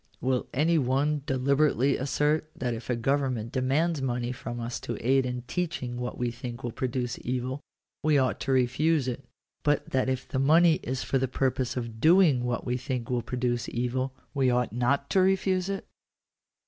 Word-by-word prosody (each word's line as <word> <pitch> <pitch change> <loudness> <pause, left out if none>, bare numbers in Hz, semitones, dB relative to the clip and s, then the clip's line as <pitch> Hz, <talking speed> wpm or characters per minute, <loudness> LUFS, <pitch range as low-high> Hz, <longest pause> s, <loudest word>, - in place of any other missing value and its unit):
Will 130 -1 0
any 160 +4 +2
one 140 +3 +1
deliberately 140 0 +2
assert 150 +3 0
that 125 -2 -2
if 115 +2 -7
a 125 - +2
government 125 -2 0
demands 140 +5 +1
money 120 -2 -1
from 120 -1 -6
us 120 +1 -4
to 120 - -5
aid 130 +1 +2
in 125 -1 -4
teaching 130 -4 -3
what 125 0 -4
we 120 -1 -1
think 120 +1 -7
will 120 - -2
produce 125 0 -2
evil, 130 +3 -3 0.4
we 155 -1 +3
ought 130 -2 +1
to 135 - -2
refuse 130 +3 +2
it; 130 +2 -3 0.4
but 145 -1 0
that 130 0 +1
if 130 -1 -2
the 130 - -2
money 160 +4 +5
is 130 +1 -3
for 135 - 0
the 130 - 0
purpose 130 0 -1
of 115 -2 -5
doing 160 -7 +5
what 120 -1 -2
we 125 0 0
think 125 -2 -4
will 125 -1 +1
produce 120 0 -2
evil, 125 +2 -1 0.2
we 135 -3 +2
ought 125 -1 +1
not 140 +4 +1
to 190 - +4
refuse 190 0 +2
it 195 -1 -3
130 Hz, 185 wpm, -28 LUFS, 125-145 Hz, 0.4 s, money